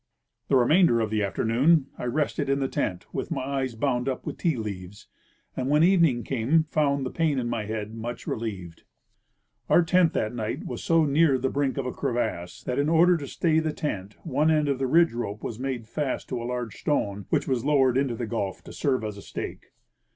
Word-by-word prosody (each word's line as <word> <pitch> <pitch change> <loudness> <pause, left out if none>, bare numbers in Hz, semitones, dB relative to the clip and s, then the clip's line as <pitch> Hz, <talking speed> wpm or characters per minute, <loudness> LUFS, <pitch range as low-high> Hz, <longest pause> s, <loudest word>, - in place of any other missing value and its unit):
The - - +2
remainder 130 +1 +5
of 110 -2 -1
the 110 -1 +1
afternoon 125 +9 +2
I - - -6
rested 145 +2 -1
in 140 0 +2
the 135 - 0
tent, 90 -8 -2
with - - -3
my - - -2
eyes 135 -2 -2
bound 125 +1 0
up 130 - -4
with - - -5
tea 165 -5 +1
leaves, 100 -2 -6 0.5
and 130 +1 -2
when 150 +2 +4
evening 165 -10 +4
came 135 +6 +2
found 145 -3 0
the 130 - -3
pain 160 -4 +1
in 125 -2 -1
my 115 -3 -2
head 110 0 -4
much 115 +2 -6
relieved. 95 -7 -5 0.9
Our 175 - +6
tent 170 0 +3
that 110 +2 -1
night 110 -2 -4
was 120 - -5
so 165 -1 +3
near 145 -1 +3
the 130 +1 -1
brink 140 -1 0
of 135 - -2
a 125 - -2
crevasse 90 -9 -3
that 125 +1 -2
in 145 +2 +2
order 170 +2 +5
to 145 -3 -6
stay 160 +3 +1
the 160 -1 -1
tent 105 - -4
one 150 0 +2
end 155 -2 +3
of 135 -2 0
the 135 - 0
ridge 165 +3 +4
rope 110 -3 -4
Avas 115 - -5
made 130 -4 -3
fast 145 +2 -3
to 125 - -3
a 120 - -4
large 125 -3 -4
stone, 100 - -1
which - - +1
was 130 -3 0
loAvered 135 -4 +3
into 135 -3 +1
the 120 - -3
gulf 105 -4 -3
to - - -11
serve 130 -5 0
as 105 -1 -4
a - - -9
stake. - - -7
130 Hz, 215 wpm, -26 LUFS, 115-150 Hz, 0.9 s, Our